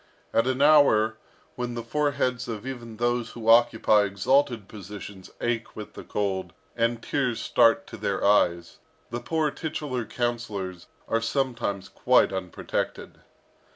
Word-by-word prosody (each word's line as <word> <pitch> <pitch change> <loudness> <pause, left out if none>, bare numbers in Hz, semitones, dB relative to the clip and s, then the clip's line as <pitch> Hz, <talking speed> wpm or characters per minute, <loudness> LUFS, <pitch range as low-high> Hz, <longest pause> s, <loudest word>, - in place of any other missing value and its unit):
At 115 +2 +3
an 130 +1 +1
hour, 110 -8 +5 0.4
when 120 -1 -4
the 120 - -4
foreheads 125 -1 0
of 110 -1 -5
even 120 -4 -7
those 120 0 -1
who 115 -2 -7
occupy 115 -2 +5
exalted 115 +3 +1
positions 100 -1 -9
ache 120 -1 -2
with 105 - -8
the - - -9
cold, 95 -2 -2 0.2
and 115 0 0
tears 125 -5 -1
start 115 0 +3
to - - -10
their 100 -2 -1
eyes, 85 -4 +2 0.3
the 120 - -2
poor 160 -2 0
titular 145 -6 -3
councillors 105 -7 -3 0.2
are 115 - +1
sometimes 120 -6 -1
quite - - +3
unprotected. 95 -2 -4
115 Hz, 135 wpm, -26 LUFS, 105-125 Hz, 0.4 s, hour